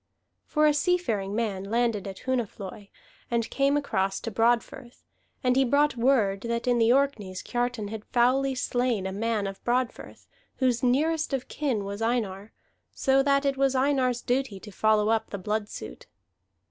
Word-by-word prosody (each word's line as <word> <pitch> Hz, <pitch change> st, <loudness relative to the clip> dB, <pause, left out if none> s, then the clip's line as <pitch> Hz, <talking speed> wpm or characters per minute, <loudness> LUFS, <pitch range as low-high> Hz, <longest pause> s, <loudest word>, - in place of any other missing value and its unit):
For 305 Hz, 0 st, +2 dB
a 300 Hz, -, +5 dB
seafaring 260 Hz, -, 0 dB
man 210 Hz, -5 st, -1 dB
landed 225 Hz, -1 st, 0 dB
at 190 Hz, -1 st, -8 dB
Hunafloi, 210 Hz, -5 st, -4 dB, 0.4 s
and 235 Hz, -1 st, 0 dB
came 275 Hz, +1 st, +2 dB
across 195 Hz, -9 st, -1 dB
to 230 Hz, -, -4 dB
Broadfirth; 240 Hz, +2 st, 0 dB, 0.4 s
and 250 Hz, -1 st, +3 dB
he 270 Hz, -, +4 dB
brought 285 Hz, +3 st, +2 dB
word 230 Hz, -6 st, +2 dB
that 235 Hz, +1 st, -2 dB
in 245 Hz, -1 st, +2 dB
the 230 Hz, +1 st, +4 dB
Orkneys 235 Hz, -9 st, 0 dB
Kiartan 245 Hz, -4 st, -2 dB
had 220 Hz, -1 st, -6 dB
foully 260 Hz, +2 st, +2 dB
slain 245 Hz, -5 st, 0 dB
a 190 Hz, -, -2 dB
man 215 Hz, +1 st, -1 dB
of 195 Hz, 0 st, -6 dB
Broadfirth, 250 Hz, 0 st, -2 dB, 0.3 s
whose 250 Hz, -3 st, +1 dB
nearest 300 Hz, +5 st, +1 dB
of 265 Hz, -2 st, -2 dB
kin 250 Hz, -9 st, -2 dB
was 200 Hz, +2 st, -5 dB
Einar, 220 Hz, -3 st, -1 dB, 0.4 s
so 270 Hz, 0 st, +2 dB
that 275 Hz, 0 st, +2 dB
it 275 Hz, -1 st, +1 dB
was 270 Hz, -1 st, +2 dB
Einar's 260 Hz, -2 st, +1 dB
duty 250 Hz, -5 st, -1 dB
to 210 Hz, -, -10 dB
follow 215 Hz, +1 st, +2 dB
up 225 Hz, 0 st, +1 dB
the 200 Hz, -, -4 dB
blood 210 Hz, +2 st, -2 dB
suit. -, -, -9 dB
240 Hz, 165 wpm, -27 LUFS, 210-265 Hz, 0.4 s, a